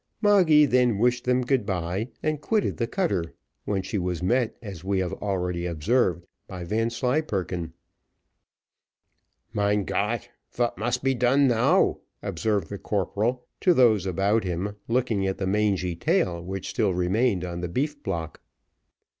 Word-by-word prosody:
Moggy 185 -8 +5
then 125 -5 +3
wished 125 +3 +1
them 125 0 +2
good 130 -1 +1
bye, 95 +4 -2
and 155 -1 -1
quitted 215 +5 0
the 115 - -1
cutter, 100 - -1 0.3
when 95 -2 -1
she 95 +2 -2
was 90 -1 -2
met, 120 +4 +1
as 100 -7 -9
we 95 +1 0
have 95 0 -1
already 90 -3 -2
observed, 85 +1 +1 0.2
by 90 -2 -7
Vanslyperken. 110 - -1 1.8
"Mein 105 -1 +1
Gott! 115 +4 -1 0.2
vat 120 -1 0
must 120 +5 -2
be 135 0 +3
done 130 +3 +3
now?" 115 -3 +3 0.2
observed 105 -6 -1
the 100 - -6
corporal 110 +5 -1
to 180 -2 +4
those 110 - +4
about 100 +4 +1
him, 95 +3 -3
looking 115 -5 +1
at 95 - -2
the 95 - -2
mangy 95 -3 +1
tail 85 0 0
which 95 +1 -5
still 100 -6 +1
remained 95 +2 +1
on 85 -1 -5
the 90 - -3
beef 145 - -2
block. 80 - -4
105 Hz, 145 wpm, -25 LUFS, 90-125 Hz, 1.8 s, Moggy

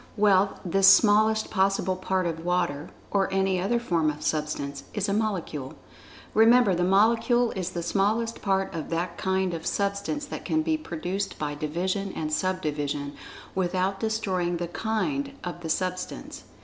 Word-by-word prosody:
Well, 200 -1 +3
this 195 +2 +4
smallest 215 +2 +5
possible 190 -1 +1
part 185 0 -1
of 165 -1 -3
water 175 -4 -1 0.2
(or 195 -1 +1
any 190 -1 +1
other 235 +6 +1
form 170 -9 +1
of 150 0 -5
Substance) 150 -2 -2
is 205 -2 0
a 200 - 0
Molecule. 185 -10 -2 0.6
Remember 225 -1 +6
the 175 0 0
Molecule 230 +5 +3
is 185 -2 -3
the 170 - -4
smallest 215 +5 0
part 195 -1 0
of 160 -2 -5
that 170 +1 -2
kind 190 -1 0
of 165 -1 -4
Substance 200 +9 -1
that - - -7
can 155 -3 0
be 160 -1 +1
produced 175 +5 -4
by 150 -1 -3
division 180 +7 -2
and 155 -1 -3
sub 185 +3 0
division, 145 -1 -2 0.4
without 190 +1 0
destroying 190 -6 -1
the 175 0 -3
"kind" 275 - -2
of 175 -1 -5
the 165 - -5
Substance. 185 +2 -3
185 Hz, 160 wpm, -26 LUFS, 170-205 Hz, 0.6 s, Remember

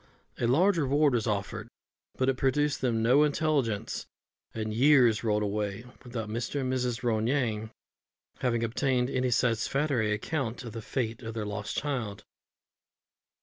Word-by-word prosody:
A 120 - +1
large 175 +9 +4
reward 145 0 +3
was 120 -2 0
offered, 100 -2 -2 0.5
but 130 - +1
it 135 - +3
produced 145 +2 +1
them 115 -3 +1
no 125 +5 +5
intelligence, 145 -7 0 0.4
and 110 -1 -3
years 125 -3 +5
rolled 105 -2 +1
away 105 +2 -2 0.2
without 120 -4 -5
Mr. 115 +6 -3
and 130 0 -1
Mrs. 125 -1 -1
Ronayne 110 -1 0 0.7
having 120 -2 0
obtained 125 +2 0
any 130 0 +1
satisfactory 120 +1 +1
account 120 +3 -2
of 115 -3 -8
the 115 - -5
fate 115 0 -3
of 115 -1 -6
their 110 -2 -2
lost 105 0 -4
child. 110 -8 -3
120 Hz, 145 wpm, -29 LUFS, 110-135 Hz, 0.7 s, no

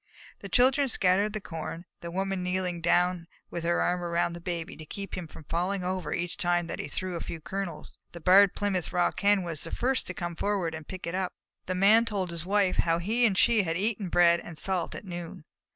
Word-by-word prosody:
The - - -8
children 265 +2 +4
scattered 200 0 +2
the 215 - -2
corn, 165 -2 -6
the 170 - -6
Woman 195 +1 -2
kneeling 180 -1 -1
down 175 0 +2 0.2
with 170 - -4
her 170 0 +2
arm 180 0 0
around 170 0 0
the 170 - -8
Baby, 170 -1 -4
to 155 - -8
keep 195 +4 -6
him 180 -3 -5
from 155 - -12
falling 180 +5 -1
over 185 0 -2
each 175 0 -2
time 175 -1 +1
that 165 - -6
he - - -4
threw 185 +4 -3
a - - -3
few 165 - -5
kernels. 190 +2 -6
The 170 - -9
Barred 190 +3 +6
Plymouth 195 -4 -1
Rock 180 -1 +1
Hen 200 -1 +3
was 165 -4 -3
the 165 - -4
first 255 +5 0
to 185 - -5
come 175 -1 -4
forward 195 -3 0
to 160 0 -6
pick 185 +4 -7
it 170 - -4
up, 185 -1 -1
and - - -52
the 185 - -1
Man 220 +4 +6
told 195 -6 -2
his 170 0 -4
wife 200 -2 +2
how 165 -1 +2
he 225 +8 +2
and 195 -3 -1
she 235 0 +5
had 165 -3 -1
eaten 205 -1 -1
bread 170 0 +5
and 165 -2 -10
salt 185 +1 -1
at - - -8
noon. 175 -2 -7
180 Hz, 230 wpm, -28 LUFS, 170-195 Hz, 0.2 s, Barred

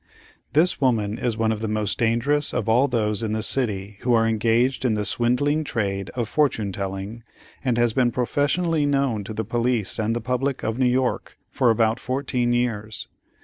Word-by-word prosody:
This 160 +4 +2
woman 115 -5 +1
is 120 -3 -1
one 110 -1 +1
of 110 - -2
the 110 - -2
most 105 -2 -1
dangerous 120 +6 +2
of 120 -3 -1
all 120 +5 +4
those 110 -4 0
in 110 -1 -2
the 110 0 -1
city 105 -6 -1
who 120 -1 +2
are 115 0 +3
engaged 115 +4 +1
in 120 -4 +2
the 105 -1 -2
swindling 135 +7 +1
trade 100 -8 -2
of 120 -3 -1
Fortune 115 -9 0
Telling, 95 +4 -5 0.4
and 125 -4 0
has 120 -2 +2
been 125 -1 +3
professionally 145 +6 0
known 135 -7 0
to 110 - -6
the 110 0 -2
police 120 -1 0
and 110 +1 0
the - - -1
public 125 +3 -2
of 110 +3 -2
New 130 - +3
York 125 0 -1
for 125 - +2
about 115 +1 +2
fourteen 125 -2 -1
years. 115 -3 -2
120 Hz, 190 wpm, -23 LUFS, 110-130 Hz, 0.4 s, all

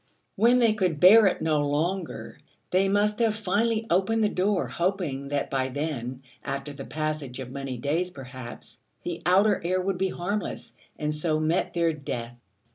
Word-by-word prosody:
When 235 +5 +5
they 230 -3 +4
could 185 -8 0
bear 205 +5 +8
it 185 - 0
no 155 -2 +2
longer, 160 +5 -2 0.3
they 190 +2 +3
must 210 +2 +2
have 225 -2 +2
finally 220 +2 0
opened 195 +5 +2
the 210 - +3
door, 195 0 +1
hoping 170 -7 -2
that 140 0 -2
by 130 -1 +1
then, 130 -2 -4 0.2
after 140 +1 -4
the 135 -1 -8
passage 155 -4 -3
of 130 -2 -7
many 135 -2 -5
days 155 +8 -1
perhaps, 130 -5 -10 0.2
the 170 -1 -4
outer 195 +3 +4
air 185 +2 +1
would 185 0 -1
be 190 0 +1
harmless, 200 +4 -4 0.2
and 150 0 -1
so 155 0 0
met 160 +4 0
their 170 -1 +2
death. 120 -5 -5
170 Hz, 170 wpm, -26 LUFS, 140-195 Hz, 0.3 s, bear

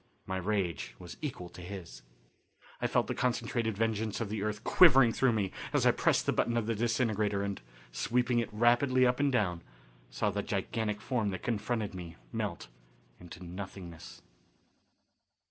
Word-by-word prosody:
My 95 - -3
rage 90 - -2
was 90 -1 -9
equal 130 - -4
to 90 - -11
his. 85 -10 -8 0.8
I - - +2
felt - - +2
the - - -2
concentrated 120 -3 -1
vengeance 110 -1 0
of 115 -3 -2
the 105 -1 -3
earth 105 +1 -3
quivering 135 -9 +7
through 130 -2 +3
me 100 -4 0 0.2
as - - +2
I - - +7
pressed - - +2
the - - +2
button 120 0 +1
of 115 - 0
the 115 - 0
disintegrator 110 -3 0
and, 100 -1 -3 0.3
sweeping 120 - +1
it 115 - -2
rapidly 120 +4 +4
up 125 0 +2
and 145 -1 +3
down, 95 -9 +1 0.5
saw 100 - 0
the 100 +1 -1
gigantic 105 +2 -2
form 115 -5 0
that 95 - -5
confronted 110 -2 -1
me 85 -3 -8 0.2
melt - - -3 0.5
into 90 0 -11
nothingness. 90 -2 -8
105 Hz, 165 wpm, -31 LUFS, 95-120 Hz, 0.8 s, quivering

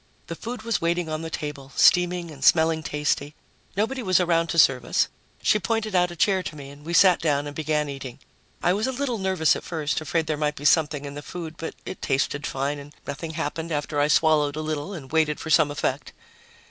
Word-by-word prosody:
The - - -6
food 235 -1 -6
was 230 -1 -1
waiting 170 0 0
on 155 0 -3
the 165 - -5
table, 145 -3 -6
steaming 180 -1 +4
and 140 -3 -10
smelling 160 -1 +4
tasty. 150 -1 -2 0.4
Nobody 255 +6 0
was 185 -5 +3
around 170 -2 +2
to 165 - -3
serve 135 -5 +5
us. - - +1 0.3
She 210 - +4
pointed 225 -1 -1
out 180 -1 +3
a 175 - -8
chair 190 +2 +2
to 165 - -6
me 140 -2 -9
and 145 +1 -14
we 165 - -6
sat 180 +1 +6
down 145 -3 +1
and 145 0 -7
began 155 -1 0
eating. 135 -3 -7 0.5
I 175 - +4
was 210 +5 0
a - - 0
little 255 -3 -2
nervous 190 -4 +2
at - - -6
first, 155 -3 -2
afraid 160 +1 -1
there 155 -1 -2
might 150 0 0
be 145 - -8
something 150 -2 +3
in 140 - -6
the 145 - -7
food, 165 0 -7
but 165 - -6
it - - -7
tasted 140 +2 0
fine 140 +2 -2
and 145 +1 -12
nothing 155 +3 -5
happened 160 +1 -3
after 145 0 -2
I 145 - +3
swallowed 150 -2 +3
a 155 - -3
little 155 +3 -3
and 140 -5 -10
waited 155 -2 +2
for 160 - -5
some 155 -3 +5
effect. 145 - -3
155 Hz, 225 wpm, -25 LUFS, 145-175 Hz, 0.5 s, sat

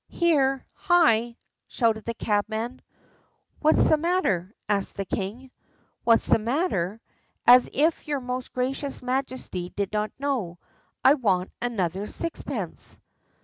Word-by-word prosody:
"Here, 275 -6 +2
hi!" 240 - +3 0.3
shouted 225 -3 0
the 230 - -3
cabman. 220 +4 -2 0.8
"What's 310 0 +4
the 310 - +4
matter?" 295 - 0
asked 200 -2 0
the 195 - -3
king. 220 +8 -4 0.5
"What's 230 -1 +4
the - - +4
matter? 225 - -1 0.5
As 250 +1 +7
if 315 +4 +1
your 290 -2 -1
most 250 0 -5
gracious 265 +2 -3
Majesty 255 -8 -3
did 200 +1 -3
not 210 0 0
know! 250 -11 -2 0.5
I 270 - +8
want 195 -10 0
another 200 -5 -2
sixpence." 335 +8 -4
240 Hz, 120 wpm, -26 LUFS, 210-275 Hz, 0.8 s, I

